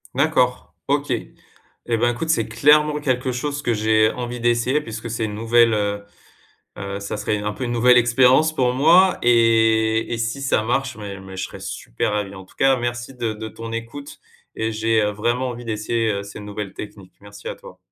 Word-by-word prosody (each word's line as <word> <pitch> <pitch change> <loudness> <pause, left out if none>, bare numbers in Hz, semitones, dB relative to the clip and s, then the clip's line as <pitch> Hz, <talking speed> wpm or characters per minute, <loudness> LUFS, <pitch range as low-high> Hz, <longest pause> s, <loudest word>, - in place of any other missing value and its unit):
D'accord, 130 -3 +1
OK 145 +1 0 0.8
et 115 -1 +1
ben, 120 +1 +2
écoute, 160 +7 -5
c'est 130 -9 +1
clairement 150 +6 +3
quelque 130 -2 0
chose 145 +3 -3
que 120 - +1
j'ai 110 0 +3
envie 125 0 -5
d'essayer 120 +4 +1
puisque 115 -3 -7
c'est 115 0 -3
une 105 - -5
nouvelle, 115 +1 +3
heu 100 -1 -1 0.7
heu, 100 0 -5
ça 100 +1 -5
serait 105 0 -1
un 105 0 -3
peu, 130 - -6
une 120 - -2
nouvelle 125 +1 +5
expérience 125 +6 +4
pour 125 -3 +2
moi 175 +7 +5
et 115 -1 +3
et - - -2
si 115 +4 -2
ça 135 -5 +1
marche, 130 +2 -1
mais 100 -2 -7
mais 95 0 -10
je - - -2
serais - - -10
super - - -3
ravi. 100 -2 -3
En 95 - -10
tout - - -23
cas, 135 0 +4
merci 120 +2 -4
de 115 -3 -2
de 110 +1 -7
ton 115 +1 -8
écoute 115 +5 -7 0.4
et 110 0 -2
j'ai, 110 0 +1
heu, 105 - +1
vraiment 120 +5 -1
envie 120 0 -8
d'essayer, 110 0 -1
heu, 100 0 -3
ces 100 - -10
nouvelles 105 -1 -6
techniques. 100 -3 -10
Merci 100 0 -11
à - - -4
toi. - - -14
115 Hz, 200 wpm, -21 LUFS, 105-125 Hz, 0.8 s, nouvelle